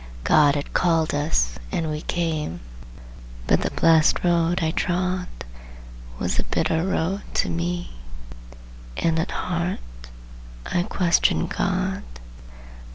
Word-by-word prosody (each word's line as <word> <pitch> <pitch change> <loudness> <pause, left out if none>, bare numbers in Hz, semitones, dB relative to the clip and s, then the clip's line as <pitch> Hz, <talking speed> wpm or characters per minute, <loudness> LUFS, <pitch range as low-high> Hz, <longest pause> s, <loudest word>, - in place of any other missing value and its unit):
God 150 -2 +5
had 145 - -4
called 165 -3 +2
us, 105 - 0
and 160 -2 -1
we 150 0 -3
came, 155 - -2 0.9
But - - +3
the - - 0
blessed 165 -1 +4
road 175 0 +2
I 160 - +1
trod 180 +1 -1 0.9
Was - - -1
a - - 0
bitter 160 0 0
road 190 +2 -1
to - - +2
me, 175 +1 -3 1.1
And 165 -1 +1
at 160 - -1
heart 175 0 -2 0.9
I 175 - 0
questioned 175 -1 +2
God. 190 0 -1
170 Hz, 115 wpm, -23 LUFS, 160-180 Hz, 1.1 s, God